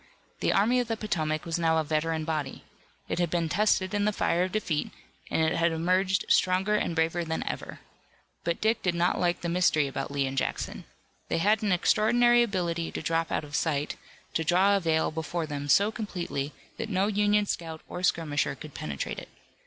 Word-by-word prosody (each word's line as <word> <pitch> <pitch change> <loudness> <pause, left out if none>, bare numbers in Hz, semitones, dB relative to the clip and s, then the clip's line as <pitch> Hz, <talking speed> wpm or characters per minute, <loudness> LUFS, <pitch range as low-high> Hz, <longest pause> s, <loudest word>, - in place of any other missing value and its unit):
The - - +1
Army 230 +6 +3
of 245 - -1
the 225 0 -2
Potomac 155 -7 -2
was 165 0 -2
now 165 -1 +2
a 160 - +2
veteran 155 +1 -1
body. 155 -3 -3 0.4
It - - -2
had 175 -2 +1
been 170 0 0
tested 195 +2 +2
in 205 0 +1
the 210 - +3
fire 175 -3 +1
of 185 0 0
defeat, 180 -8 -1 0.4
and 160 - +1
it 160 +1 +1
had 165 0 +3
emerged 185 +4 +1
stronger 185 +3 +3
and 190 -5 0
braver 165 +1 +1
than 160 -1 -3
ever. - - -5 0.6
But 170 0 -1
Dick 220 +1 +1
did 180 -2 0
not 175 +1 +1
like 175 -1 +1
the 175 - -2
mystery 170 -3 +3
about 135 0 -4
Lee 140 -1 0
and 135 0 -4
Jackson. - - -3 0.4
They - - +1
had 210 +6 +3
an 210 -2 0
extraordinary 240 +6 +4
ability 175 -7 -1
to - - -4
drop 165 0 0
out - - 0
of 145 -1 -11
sight, 150 -2 0 0.4
to 165 - 0
draw 185 +5 +4
a - - +2
veil 160 -3 +1
before 160 +1 -3
them 145 -1 -5
so 200 +9 +5
completely 180 -10 -4 0.3
that 225 -1 -4
no 190 -1 +1
Union 210 0 +2
scout 165 -4 -4
or 180 - -6
skirmisher 155 -6 0
could 150 +1 -10
penetrate 70 -3 -4
it. - - -12
170 Hz, 200 wpm, -28 LUFS, 160-200 Hz, 0.6 s, so